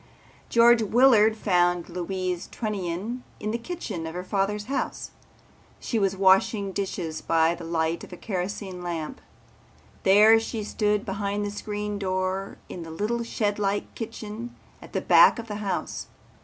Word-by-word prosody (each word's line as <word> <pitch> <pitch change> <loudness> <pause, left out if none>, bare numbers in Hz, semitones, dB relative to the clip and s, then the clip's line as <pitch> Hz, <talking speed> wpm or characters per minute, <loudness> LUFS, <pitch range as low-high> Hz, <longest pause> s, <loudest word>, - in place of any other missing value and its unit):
George 235 0 +6
Willard 220 -1 +5
found 175 -4 +2
Louise 180 0 -3
Trunnion 210 +2 -3 0.2
in 210 - -2
the 230 - -1
kitchen 230 - -5
of 160 - -7
her 180 - -4
father's 200 +2 -1
house. 275 +4 -3 0.7
She 230 - -1
was 195 -1 +1
washing 195 +1 +3
dishes 185 -5 -3
by 165 0 +3
the 170 0 -8
light 165 0 -1
of - - -11
a 180 - -8
kerosene 190 -1 -4
lamp. 170 -3 -4 0.8
There 210 +3 +7
she 225 -1 -4
stood 210 0 0
behind 200 +1 -2
the 205 - -3
screen 210 0 -4
door 185 0 -2
in 175 - -7
the 165 - -8
little 210 +9 -2
shedlike 205 -3 -1
kitchen 225 +1 -7 0.3
at - - -13
the - - 0
back - - +6
of 230 -1 -6
the 210 -2 -4
house. 205 -2 -3
200 Hz, 150 wpm, -26 LUFS, 180-215 Hz, 0.8 s, There